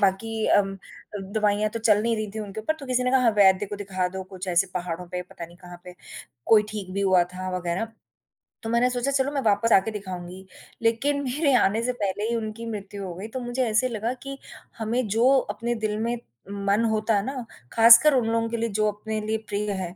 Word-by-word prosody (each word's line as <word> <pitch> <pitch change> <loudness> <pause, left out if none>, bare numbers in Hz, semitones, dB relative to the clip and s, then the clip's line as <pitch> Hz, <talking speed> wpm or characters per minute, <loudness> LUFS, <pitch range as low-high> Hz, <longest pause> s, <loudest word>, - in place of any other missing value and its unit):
बाकी 215 +3 0
अम 195 -1 0
अ, 195 +1 -12
दवाइयाँ 210 +1 0
तो 230 - -4
चल 215 -2 +3
नहीं 230 0 +1
रही 215 -1 -3
थी - - -4
उनके 210 0 -6
ऊपर 265 +9 -1
तो 275 - -8
किसी 255 0 0
ने 250 - +1
कहा 265 0 +4
हाँ, 240 -2 +4
वैध 195 0 +5
को 205 - -5
दिखा 190 -2 -2
दो 190 +1 -6
कुछ 185 0 -8
ऐसे 180 +2 +3
पहाड़ों 180 -1 -4
पे 180 +1 -4
पता 175 -1 -10
नहीं 175 +1 -17
कहाँ 175 -1 -12
पे, 180 0 -10 0.5
कोई 215 -2 +6
ठीक 200 -4 -6
भी 200 - -1
हुआ 190 -2 +4
था 185 0 -4
वगैरह, 180 +5 -2 0.8
तो 225 - -4
मैंने 235 +2 +3
सोचा 250 +2 -1
चलो, 275 +1 +1
मैं 280 - -1
वापस 215 0 +2
आके 195 +3 +4
दिखाऊँगी, 185 -2 -7 0.4
लेकिन 275 +6 +1
मेरे 280 +2 +1
आने 220 -1 +2
से 250 +1 0
पहले 205 +2 -1
ही 235 - 0
उनकी 225 0 -4
मृत्यु 200 -1 -6
हो 180 - -5
गई 195 +4 -7
तो - - -1
मुझे 245 +1 -2
ऐसे 235 +4 +2
लगा 230 +1 -2
कि 275 0 -6 0.4
हमें 230 +2 -1
जो 225 +5 +3
अपने 240 -1 -3
दिल 210 0 -1
में 235 +2 -1 0.3
मन 200 +2 +1
होता 215 0 +1
है 200 0 0
ना, 260 -2 -4 0.3
ख़ासकर 230 +6 +8
उन 245 -3 +2
लोगों 230 0 0
के 235 - -2
लिए 230 0 -1
जो 215 - +3
अपने 215 +1 -5
लिए 220 +1 -1
प्रिय 205 0 -2
हैं, 185 -2 -4
215 Hz, 230 wpm, -25 LUFS, 195-235 Hz, 0.8 s, ख़ासकर